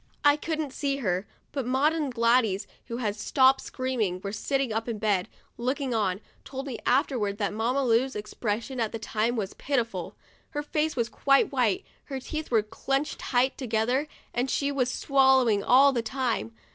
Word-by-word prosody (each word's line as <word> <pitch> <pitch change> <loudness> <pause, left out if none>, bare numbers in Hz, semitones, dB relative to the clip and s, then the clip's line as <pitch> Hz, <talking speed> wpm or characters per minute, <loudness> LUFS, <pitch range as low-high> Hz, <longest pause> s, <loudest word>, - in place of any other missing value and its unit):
I 290 0 +7
couldn't 305 -2 -3
see 275 0 -1
her, 185 -6 -1 0.2
but 275 - -2
Maud 270 +5 +3
and 305 -4 -1
Gladys, 230 -4 +2 0.2
who 235 - -4
had 215 -4 -1
stopped 260 +5 +4
screaming, 250 -8 -2
and 185 - -11
were 200 - -3
sitting 265 +3 -1
up 225 +2 -2
in 225 - -2
bed, 205 -4 0 0.3
looking 260 +2 -1
on, 205 -3 0 0.2
told 270 0 -6
me 260 -4 -5
afterwards 245 -6 +1
that 205 -1 -1
Mamma 240 +6 0
Lu's 245 +3 +2
expression 215 +4 -3
at 225 -2 -1
the - - -2
time 225 +2 -1
was 205 -4 -3
pitiful. 230 -10 -2 0.3
Her 295 -2 -3
face 305 +1 -1
was 235 -2 0
quite 275 +3 +3
white, 245 -8 +1 0.2
her 270 -2 -4
teeth 310 +4 -5
were 225 -3 +3
clinched 270 +7 -2
tight 255 +1 +1
to 260 - -4
gether, 240 +6 +1 0.3
and 245 +2 0
she 280 +2 0
was 255 -3 +1
swallowing 265 -6 +3
all 275 +3 +6
the 240 - 0
time. 225 - -2
250 Hz, 185 wpm, -27 LUFS, 220-275 Hz, 0.3 s, I